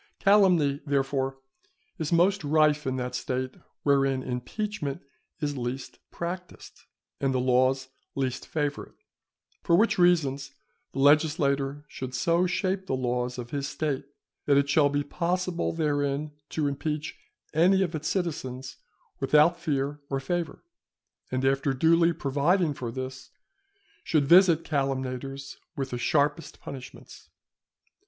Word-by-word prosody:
Calumny, 180 -9 +4
therefore, 135 -2 0 0.6
is 160 0 -2
most 180 +3 +3
rife 150 0 +3
in 130 - 0
that 125 -1 -3
State 130 +1 -2 0.3
wherein 135 -2 +2
impeachment 140 - -4 0.4
is 145 -1 -1
least 125 +2 -5
practised, 180 +1 -7 0.3
and 135 -1 0
the - - +2
laws 130 +1 +2 0.3
least 130 -2 -2
favour 145 -2 -2
it. - - -24 0.7
For 170 - +3
which 215 +1 +3
reasons 140 -6 +2 0.4
the - - -9
legislator 145 -1 +2
should 130 -3 -6
so 170 +6 +2
shape 190 +1 -1
the 130 - 0
laws 125 -1 -1
of 120 -1 -7
his 140 -1 -2
State 145 -3 -2 0.4
that 140 -1 +5
it 140 0 +3
shall 145 0 +4
be 145 0 0
possible 175 +3 -1
therein 145 -2 -1 0.2
to 155 - -1
impeach 150 +2 -3 0.4
any 185 +5 +4
of 175 -2 -3
its 155 0 -3
citizens 130 -9 -3 0.4
without 150 +5 +4
fear 145 -2 -2
or 135 - -1
favour; 170 +3 -3 0.7
and, 130 +1 -1
after 135 +1 +2
duly 165 +5 +4
providing 150 +4 +1
for 125 -5 -5
this, 130 +1 -6 0.7
should 155 -4 +2
visit 170 0 +6
calumniators 135 -1 -3 0.2
with 135 -3 -3
the 125 - -3
sharpest 145 +5 0
punishments. 130 -2 -10
145 Hz, 130 wpm, -27 LUFS, 135-165 Hz, 0.7 s, visit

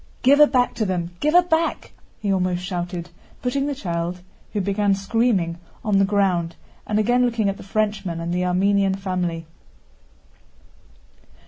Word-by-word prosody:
"Give 280 +3 +6
her 300 - +9
back 250 -3 +2
to 220 - +1
them, 175 -2 -2
give 300 +3 +1
her 355 - +8
back!" 330 -1 -1 0.3
he 200 -2 +1
almost 180 -1 0
shouted, 175 -1 -4 0.3
putting 275 +3 0
the 285 - -2
child, 175 -5 -3 0.3
who 210 - -2
began 200 +1 +1
screaming, 195 -5 0 0.3
on 205 -2 +3
the 195 - +4
ground, 185 -4 +1 0.3
and 210 - 0
again 245 +4 +3
looking 230 -4 +1
at 195 - -3
the - - -11
Frenchman 205 -4 -2
and 170 +1 -3
the 180 0 0
Armenian 195 +2 +2
family. 180 -4 -3
195 Hz, 155 wpm, -22 LUFS, 180-225 Hz, 0.3 s, her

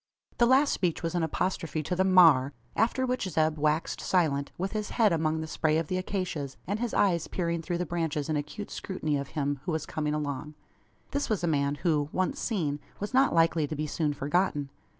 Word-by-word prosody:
The 240 - +6
last 270 +3 +5
speech 175 -2 -1
was 165 - -1
an 175 - 0
apostrophe 160 -1 -1
to 180 - -2
the 190 - +2
"maar" 165 -8 +6 0.2
after 240 +4 +2
which 250 -6 -1
Zeb 155 -2 +1
waxed 155 +2 0
silent, 145 -6 +1
with 190 +2 -2
his 215 -1 -3
head 215 -6 +3
among 160 -1 0
the 160 - -4
spray 155 0 +1
of 160 -2 -2
the 185 - 0
acacias, 180 -8 -3
and 205 +3 -2
his 240 -1 -2
eyes 175 -5 +2
peering 170 -2 -2
through 175 +1 -2
the 180 - -1
branches 160 -4 -2
in 155 - 0
acute 150 +8 -5
scrutiny 155 -6 -2
of 140 -1 -2
him 145 -1 0
who - - -1
was 160 -2 -2
coming 150 -1 -2
along. 150 0 -4 0.6
This 285 0 -1
was 210 -5 0
a - - +2
man, 140 -2 +1
who, 150 -4 +2
once 185 0 -1
seen, 155 -10 -1 0.2
was 205 +5 -4
not 265 +1 +4
likely 165 -2 +3
to 155 - -4
be 155 +1 -2
soon 150 0 -1
forgotten. 145 0 0
165 Hz, 210 wpm, -28 LUFS, 150-185 Hz, 0.6 s, The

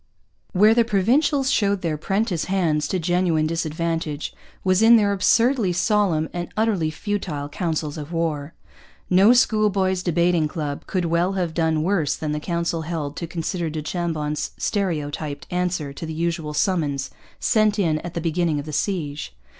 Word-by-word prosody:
Where 210 +3 +5
the 235 0 +4
Provincials 260 +7 +2
showed 200 -3 +1
their 160 -2 0
'prentice 195 +2 -1
hands 165 -6 +1
to 185 - -1
genuine 175 -2 +1
disadvantage 165 -1 -2 0.3
was 185 +1 +3
in 230 +1 +8
their 205 -3 +3
absurdly 225 +1 +3
solemn 180 -4 +1
and 175 -1 -4
utterly 210 -8 +1
futile 160 -4 -3
councils 155 -1 -3
of 150 +2 -8
war. 160 -3 -2 0.6
No 190 +5 +6
schoolboys' 205 -6 +2
debating 175 -2 +2
club 150 -2 -5
could 185 -2 -1
well 170 +3 +1
have 180 -4 -2
done 160 -2 +1
worse 170 -5 +1
than 155 -1 -3
the 150 - -1
council 170 0 -2
held 155 -3 -4
to 170 - -4
consider 170 0 -3
du 155 0 -4
Chambon's 155 -3 -2
stereotyped 150 -7 -2
answer 180 -5 -1
to 160 - -7
the 160 - -5
usual 165 -2 -2
summons 145 -8 0 0.3
sent 215 -1 +2
in 160 -6 +1
at 175 +2 -8
the 170 - -2
beginning 165 -2 0
of 145 - -7
a 155 - -6
siege. 150 - -2
170 Hz, 160 wpm, -23 LUFS, 155-195 Hz, 0.6 s, in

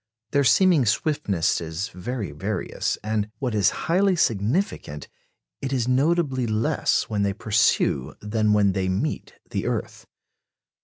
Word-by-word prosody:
Their 140 - +3
seeming 145 - +4
swiftness 110 - 0
is 85 +6 -4
very 105 - -5
various, 75 - -3
and 105 -1 -1
what 125 -4 -2
is 105 -2 +3 0.2
highly 185 +3 +3
significant 110 - -1 0.5
it 135 - -3
is 125 -3 0
notably 135 -1 +1
less 110 +1 +1
when 105 -2 -3
they 100 -1 +1
pursue 95 - +1
than 105 0 0
when 105 -1 +4
they 95 -1 -1
meet 115 +12 -3 0.2
the - - -2
earth. - - -4
110 Hz, 135 wpm, -24 LUFS, 100-135 Hz, 0.5 s, seeming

